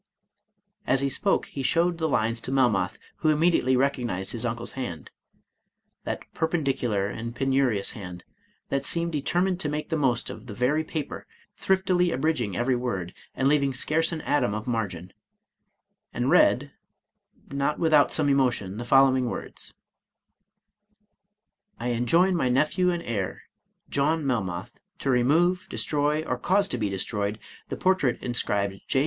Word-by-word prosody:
As 135 Hz, -, +3 dB
he 140 Hz, -, +1 dB
spoke 195 Hz, +9 st, +1 dB
he 140 Hz, -, -6 dB
showed 170 Hz, +5 st, +1 dB
the 160 Hz, -1 st, 0 dB
lines 115 Hz, -2 st, 0 dB
to 130 Hz, -, -4 dB
Melmoth, 120 Hz, -9 st, +2 dB, 0.2 s
who 155 Hz, -, +1 dB
immediately 155 Hz, -4 st, +3 dB
recog 135 Hz, 0 st, +1 dB
nized 95 Hz, -4 st, -3 dB
his 120 Hz, 0 st, -2 dB
uncle's 115 Hz, 0 st, -4 dB
hand 120 Hz, -12 st, -6 dB, 0.9 s
(that -, -, -3 dB
perpendicular 135 Hz, -, 0 dB
and 115 Hz, +4 st, -5 dB
penurious 130 Hz, -6 st, +1 dB
hand, 90 Hz, -4 st, -8 dB, 0.5 s
that 140 Hz, 0 st, 0 dB
seems 170 Hz, +3 st, -1 dB
determined 175 Hz, +5 st, 0 dB
to 150 Hz, -, -2 dB
make 150 Hz, +2 st, -3 dB
the 160 Hz, -, 0 dB
most 130 Hz, -5 st, 0 dB
of -, -, -10 dB
the 105 Hz, -, -7 dB
very 145 Hz, +7 st, +1 dB
paper, 155 Hz, -1 st, -5 dB, 0.3 s
thriftily 185 Hz, -2 st, +2 dB
abridging 125 Hz, -, 0 dB
every 125 Hz, +1 st, +1 dB
word, 100 Hz, -8 st, -3 dB, 0.2 s
and 135 Hz, -, +1 dB
leaving 140 Hz, -2 st, +2 dB
scarce 160 Hz, +6 st, +1 dB
an 160 Hz, -2 st, -4 dB
atom 125 Hz, -8 st, +1 dB
of 110 Hz, -, -4 dB
margin), 95 Hz, -7 st, -3 dB, 1.0 s
and -, -, -1 dB
read, -, -, +4 dB, 0.8 s
not 140 Hz, +2 st, 0 dB
without 155 Hz, -4 st, +4 dB
some 155 Hz, -2 st, +1 dB
emotion, 125 Hz, -8 st, +1 dB
the 120 Hz, -, -5 dB
following 130 Hz, -1 st, +4 dB
words: -, -, -6 dB, 1.4 s
" 205 Hz, +1 st, -46 dB
I 120 Hz, +1 st, -2 dB
enjoin 165 Hz, +11 st, +3 dB
my 130 Hz, -7 st, +1 dB
nephew 155 Hz, +8 st, +2 dB
and 175 Hz, -1 st, -2 dB
heir, 100 Hz, -5 st, -3 dB, 0.4 s
John 150 Hz, +2 st, +1 dB
Melmoth, 110 Hz, -4 st, -2 dB, 0.2 s
to 135 Hz, -, -1 dB
remove, 160 Hz, +9 st, +2 dB
destroy, 150 Hz, +1 st, 0 dB
or 125 Hz, -5 st, -3 dB
cause 195 Hz, +8 st, +2 dB
to 125 Hz, -, -2 dB
be 105 Hz, -2 st, 0 dB
destroyed, 100 Hz, +2 st, -2 dB, 0.3 s
the -, -, -4 dB
portrait 185 Hz, -10 st, +2 dB
inscribed 100 Hz, -5 st, -1 dB
J. 130 Hz, -, +2 dB
135 Hz, 150 wpm, -26 LUFS, 115-155 Hz, 1.4 s, read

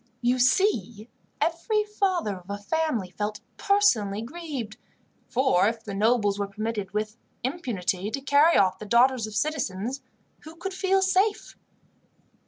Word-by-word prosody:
You 250 Hz, +1 st, +2 dB
see, 240 Hz, -, +1 dB, 0.3 s
every 420 Hz, +6 st, 0 dB
father 380 Hz, -, -1 dB
of 180 Hz, +1 st, -16 dB
a 200 Hz, -, -3 dB
family 235 Hz, -, -1 dB
felt 210 Hz, +2 st, -3 dB, 0.2 s
personally 225 Hz, -, +2 dB
grieved, 265 Hz, -6 st, -6 dB, 0.5 s
for 245 Hz, -7 st, +3 dB
if 225 Hz, 0 st, -2 dB
the 210 Hz, -3 st, -6 dB
nobles 205 Hz, -1 st, +2 dB
were 200 Hz, -, -1 dB
permitted, 210 Hz, -1 st, -4 dB
with 215 Hz, +2 st, -3 dB, 0.3 s
impunity, 215 Hz, -, -2 dB
to 275 Hz, -, -3 dB
carry 285 Hz, +4 st, +4 dB
off 190 Hz, -1 st, +3 dB
the 215 Hz, -, -7 dB
daughters 240 Hz, +1 st, +3 dB
of 215 Hz, -, -9 dB
citizens, 260 Hz, -4 st, -2 dB, 0.4 s
who 315 Hz, +1 st, -12 dB
could 375 Hz, +3 st, -5 dB
feel 385 Hz, 0 st, +2 dB
safe? 390 Hz, +3 st, +1 dB
240 Hz, 140 wpm, -26 LUFS, 205-330 Hz, 0.5 s, carry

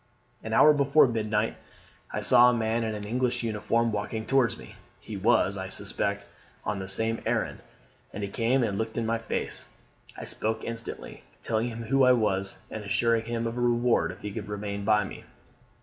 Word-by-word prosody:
"An 110 Hz, -, -5 dB
hour 150 Hz, +7 st, +7 dB
before 140 Hz, 0 st, +4 dB
midnight 110 Hz, -2 st, -1 dB, 0.5 s
I -, -, -3 dB
saw 120 Hz, +1 st, +8 dB
a 125 Hz, -, +1 dB
man 115 Hz, 0 st, 0 dB
in 110 Hz, -1 st, -2 dB
an 105 Hz, -, -6 dB
English 125 Hz, +3 st, -1 dB
uniform 115 Hz, +1 st, 0 dB
walking 110 Hz, +1 st, -3 dB
towards 135 Hz, -4 st, +2 dB
me. -, -, -12 dB, 0.3 s
He 110 Hz, -, -8 dB
was, 100 Hz, -1 st, +2 dB
I 95 Hz, -, -4 dB
suspect, 100 Hz, 0 st, -2 dB, 0.4 s
on 105 Hz, -1 st, -2 dB
the 95 Hz, -, -5 dB
same 110 Hz, +4 st, +1 dB
errand, -, -, -1 dB, 0.5 s
and 105 Hz, -, -6 dB
he 100 Hz, -, -3 dB
came 120 Hz, +5 st, +1 dB
and 100 Hz, -3 st, -1 dB
looked 110 Hz, 0 st, -3 dB
in 115 Hz, -, 0 dB
my 115 Hz, +1 st, 0 dB
face. 115 Hz, -, -3 dB, 0.5 s
I -, -, -6 dB
spoke 110 Hz, +1 st, -2 dB
instantly, 115 Hz, 0 st, -5 dB, 0.2 s
telling 110 Hz, +1 st, 0 dB
him 115 Hz, 0 st, -6 dB
who 135 Hz, +4 st, +2 dB
I 125 Hz, 0 st, +7 dB
was, 100 Hz, -4 st, 0 dB
and 110 Hz, -, -5 dB
assuring 115 Hz, +3 st, +1 dB
him 115 Hz, 0 st, -2 dB
of 115 Hz, +1 st, -3 dB
a -, -, -1 dB
reward 120 Hz, 0 st, +2 dB
if -, -, -13 dB
he 105 Hz, -, -4 dB
would 100 Hz, -, -6 dB
remain 100 Hz, -1 st, -4 dB
by 105 Hz, -1 st, +4 dB
me. 95 Hz, -, -9 dB
110 Hz, 195 wpm, -27 LUFS, 105-120 Hz, 0.5 s, saw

